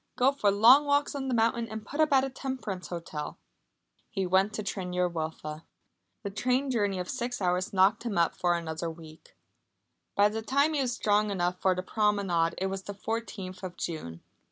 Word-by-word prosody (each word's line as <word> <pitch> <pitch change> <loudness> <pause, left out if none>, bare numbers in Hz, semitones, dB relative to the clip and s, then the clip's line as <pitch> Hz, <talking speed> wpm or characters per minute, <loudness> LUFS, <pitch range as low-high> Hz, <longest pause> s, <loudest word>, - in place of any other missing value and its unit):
Go 255 +2 +4
for 245 -7 +1
long 235 +9 +7
walks 285 +1 +2
on 275 -2 -3
the 255 - 0
mountains, 230 0 +1
and 220 0 -6
put 290 - -7
up 310 -1 +4
at 265 -1 +5
a 270 - -1
temperance 255 -9 -5
hotel." 165 -4 -6 0.7
He 195 - -2
went 190 +3 +3
to 215 - -3
Tryn 190 -3 -4
yr 180 0 +2
Wylfa. 160 -2 -5 0.6
The 200 - -4
train 255 +6 0
journey 205 -5 +1
of 180 0 -3
six 245 +1 -3
hours 180 -1 0
knocked 195 +3 +4
him 230 -5 -3
up 170 -1 +2
for 175 -1 +1
another 165 0 -3
week. 160 -1 -13 0.8
By 205 +1 +5
the 220 +1 -4
time 280 +7 +2
he 290 - +1
was 255 -2 0
strong 210 -2 +2
enough 180 -2 -1
for 185 -1 +3
the 185 - -3
promenade 195 -6 +1
it 190 - -1
was 190 0 -3
the 200 +1 -7
fourteenth 200 -4 -5
of 185 -2 -7
June. 85 - -5
200 Hz, 200 wpm, -29 LUFS, 180-235 Hz, 0.8 s, long